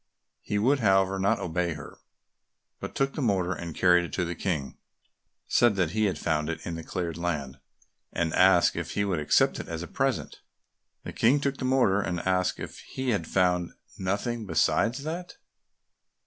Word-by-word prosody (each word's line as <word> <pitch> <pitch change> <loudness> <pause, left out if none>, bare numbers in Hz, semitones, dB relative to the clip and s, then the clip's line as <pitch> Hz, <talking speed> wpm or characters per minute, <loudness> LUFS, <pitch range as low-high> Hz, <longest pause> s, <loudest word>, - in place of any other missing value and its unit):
He 105 - -2
would, 130 +7 +3
however, 95 -3 +3
not 100 +4 +2
obey 85 0 -1
her, 75 - -11 0.8
but - - -7
took 135 0 0
the - - -4
mortar 95 -7 +1
and 85 -2 -7
carried 90 -1 +4
it 85 - -6
to 90 - 0
the 85 - -3
King, 80 -6 -3 0.7
said 120 -3 +4
that 90 -4 +1
he 110 +2 +1
had 95 -6 0
found 75 0 -1
it 80 -1 -3
in 85 - -4
the 80 - -5
cleared 85 -2 -4
land, 75 -6 -3 0.5
and 85 -1 -1
asked 90 -1 +5
if - - -4
he 100 - 0
would 95 -5 -1
accept 75 - +2
it - - -6
as 85 0 -5
a - - -7
present. 135 -2 -2 0.6
The - - -7
King 130 +6 +3
took 140 -1 -1
the 130 - -4
mortar, 125 -7 +3
and 90 -3 -2
asked 90 -1 0
if - - -7
he 130 -1 -5
had 95 -7 -1
found 90 -2 +1 0.2
nothing 105 +4 -2
besides 120 +7 +1
that? 170 +4 -6
95 Hz, 185 wpm, -27 LUFS, 85-115 Hz, 0.8 s, asked